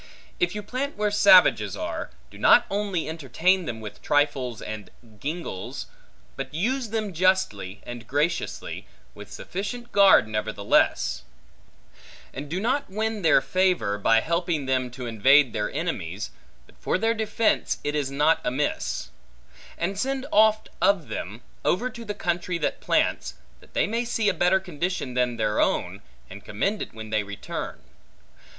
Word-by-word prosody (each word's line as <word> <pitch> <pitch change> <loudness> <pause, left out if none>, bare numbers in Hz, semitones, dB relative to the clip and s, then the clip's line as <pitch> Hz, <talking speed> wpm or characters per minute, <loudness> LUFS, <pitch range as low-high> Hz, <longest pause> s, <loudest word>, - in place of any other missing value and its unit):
If 355 - +1
you 210 - -4
plant 255 +6 -4
where 210 0 +1
savages 210 +9 +5
are, - - -4 0.2
do - - -13
not - - +6
only 200 -4 -1
entertain 165 +5 +1
them, 115 -5 -4
with 105 -2 -9
trifles 140 -6 +1
and 110 -2 -7 0.3
gingles, 150 - -5 0.5
but - - -5
use 235 - -1
them 215 -3 -2
justly 170 - +1
and 120 -1 -8
graciously, 150 +5 -2 0.3
with 105 0 -12
sufficient 235 +6 -6
guard 195 - +6
nevertheless; 105 -1 +1 1.1
and 140 +2 -7
do 175 +4 -2
not 255 +6 0
win 220 +2 -2
their 160 -5 +5
favor, 135 - +1
by 115 +2 +4
helping 170 -2 -1
them 130 -1 0
to 125 +1 -8
invade 130 +4 +4
their 105 -2 -1
enemies, 105 - -3 0.3
but - - -23
for - - 0
their 225 +4 +1
defence 220 0 0
it 145 - -1
is 145 -3 -1
not 150 +4 +2
amiss; 135 +4 -2 0.7
and 190 +3 -2
send 270 +3 -1
oft 215 +1 +4
of 195 -7 +2
them, 105 +7 -6 0.2
over 245 +8 +1
to 235 -2 -9
the 205 -2 -5
country 175 0 -1
that 155 - -2
plants, - - 0 0.2
that - - -22
they - - +3
may 230 +3 -1
see 225 -3 +1
a - - +1
better 180 +2 +3
condition 180 -6 -3
than 125 -1 0
their 105 -1 0
own, - - 0 0.3
and 100 +2 -11
commend 195 - -1
it - - -5
when 110 -1 -9
they 110 -1 +2
return. 100 0 -6
165 Hz, 155 wpm, -25 LUFS, 120-205 Hz, 1.1 s, not